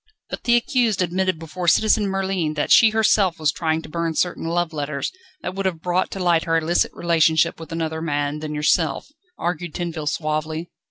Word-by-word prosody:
"But - - -6
the 240 - +4
accused 240 - +1
admitted 185 0 0
before 165 +2 -6
Citizen 215 +3 +4
Merlin 190 -5 -1
that 145 - -1
she 225 - +8
herself 210 -5 +2
was 155 -1 +2
trying 160 -1 -1
to - - -9
burn 165 0 -2
certain 175 -1 -1
love 170 0 -1
letters, 145 -1 -3 0.3
that 185 - -3
would 195 0 -1
have 165 -3 -4
brought 180 +1 0
to 195 - -6
light 175 -3 +2
her 165 0 +2
illicit 165 +2 +1
relationship 165 -1 +2
with 165 - -10
another 160 -1 -3
man 145 -1 -1
than 150 -1 -5
yourself," 155 - +1 0.3
argued 175 -1 -3
Tinville 165 -4 -4
suavely. 155 +2 -3
170 Hz, 185 wpm, -22 LUFS, 155-185 Hz, 0.3 s, she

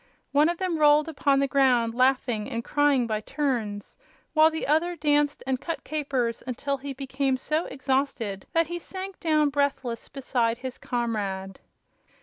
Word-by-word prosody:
One 295 +3 +4
of 345 - -2
them 360 -3 -1
rolled 300 +1 +5
upon 280 -3 +2
the 275 - +2
ground, 250 -4 +3
laughing 250 -3 +1
and 230 -3 -3
crying 290 -3 +2
by 215 -2 -2
turns, 225 -7 -3 0.4
while 310 0 +6
the 320 0 -4
other 325 +4 +2
danced 295 -2 +1
and 260 -1 -1
cut 335 - -4
capers 270 -6 -2
until 275 +3 -2
he 280 +1 -6
became 270 0 -1
so 305 +5 -1
exhausted 265 -7 -2
that 330 0 +3
he 345 +2 -5
sank 380 +2 -7
down 305 -3 +2
breathless 275 -4 -1
beside 245 -4 -1
his 255 0 -7
comrade. 200 -6 -3
275 Hz, 155 wpm, -26 LUFS, 240-300 Hz, 0.4 s, while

